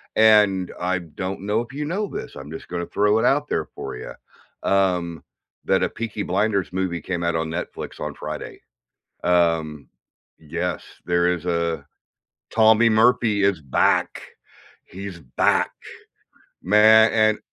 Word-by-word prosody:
and 105 -4 +4
I 90 0 0
don't 95 +3 -6
know 105 +3 0
if 120 +3 -10
you 150 +1 -4
know 200 +6 -2
this. - - -7
I'm 70 +3 -9
just 80 - -8
gonna 85 -1 -4
throw 105 +2 +2
it - - +1
out 145 +2 +2
there 80 - -1
for - - -6
you, - - -8 0.5
um, 90 -4 0 0.4
that - - +2
a - - +1
Peaky 110 -2 -5
Blinders 100 0 0
movie 90 -2 -2
came 90 -2 -3
out 85 -1 0
on 80 0 -1
Netflix 85 +2 -6
on - - -4
Friday. - - -7 0.6
Um, 80 -5 +1 0.5
yes, 75 -2 -4 0.2
there 90 0 +2
is 90 0 -6
a 85 -4 -1 0.7
Tommy 110 +1 +5
Murphy 110 -2 +3
is 100 -5 +2
back. 70 - +1 0.6
He's 95 -2 -9
back, 65 - +1 0.9
man 110 +3 +6
and 110 -1 +3
95 Hz, 145 wpm, -22 LUFS, 85-110 Hz, 0.9 s, man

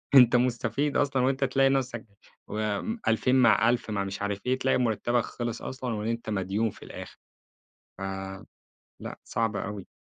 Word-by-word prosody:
أنت 125 -2 +8
مستفيد 125 +3 +1
أصلًا، 140 -3 +2
وأنت 135 +1 +1
تلاقي 135 0 +3
نفسك 130 -3 -1 0.4
وم 110 - -2
2000 115 +3 +3
مع 120 -2 +5
1000 120 -2 0
مع 100 -2 0
مش 95 +1 -5
عارف 100 -1 -1
إيه، 130 +1 +2
تلاقي 130 - +2
مُرتَّبك 120 0 +1
خِلِص 120 -1 -4
أصلًا 130 -2 -4
وأنت 115 +1 -3
مديون 105 +2 0
في - - -13
الآخر. - - -9 0.8
ف - - -14 1.0
لأ - - -7
صعب 115 -2 -1
أوي. 100 -1 -4
120 Hz, 155 wpm, -28 LUFS, 105-130 Hz, 1.0 s, أنت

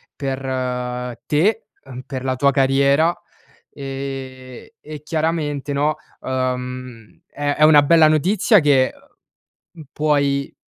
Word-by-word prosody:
per 135 -1 -4 0.9
te, 195 +10 +1 0.2
uhm, 130 -2 -9
per 130 -2 -6
la 130 -1 -1
tua 140 +2 +2
carriera, 140 +4 +3 0.6
ehm, 135 -2 -7
e 150 -1 -10
chiaramente 155 -3 -2
no, 150 +2 +1 0.3
uhm, 125 -3 -5
è 145 0 -3
è 150 - +3
una 155 -1 +7
bella 160 +1 +5
notizia 185 - +3
che, 140 -4 +2 0.8
mhmm, 165 - -12
puoi 140 -2 0
140 Hz, 110 wpm, -20 LUFS, 130-155 Hz, 0.9 s, una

